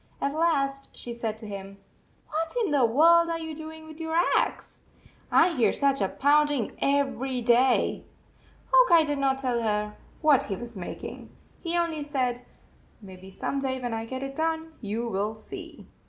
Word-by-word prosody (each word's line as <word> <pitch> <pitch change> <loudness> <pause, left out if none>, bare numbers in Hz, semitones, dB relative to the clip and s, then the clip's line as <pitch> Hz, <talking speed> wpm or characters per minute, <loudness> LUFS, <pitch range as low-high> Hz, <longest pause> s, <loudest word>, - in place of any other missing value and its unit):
At 280 - -1
last 275 -4 0
she 240 - -3
said 225 -2 -3
to 220 - -9
him: 195 -1 -8 0.3
" - - -37
What 325 +7 -2
in 375 - -2
the 275 -4 +4
world 335 +8 +5
are 335 - -1
you 320 -1 -6
doing 315 +1 -9
with 315 0 -12
your 320 0 -3 0.2
axe? - - -1 0.5
I 345 - +6
hear 265 -9 +2
such 275 -3 +1
a 195 - +2
pounding 290 -4 +2
everyday." 260 -3 +2 0.7
Hawk - - +6
Eye 335 -2 +7
did 290 -2 -2
not 270 -1 +2
tell 250 -3 -1
her 210 -1 -1 0.3
what 300 -4 +4
he 195 - -3
was 240 +3 -8
making. 180 -3 -7 0.3
He 340 0 -1
only 335 -3 0
said, 255 -4 -1 0.3
" - - -32
Maybe 190 -1 -11
some 275 +8 -3
day, 260 -1 -2
when 245 -2 -3
I 225 0 -3
get 260 +3 -5
it 275 0 -6
done, 320 +1 -2
you 225 +2 -3
will 210 0 -2
see." 215 - -9
275 Hz, 180 wpm, -27 LUFS, 230-315 Hz, 0.7 s, Eye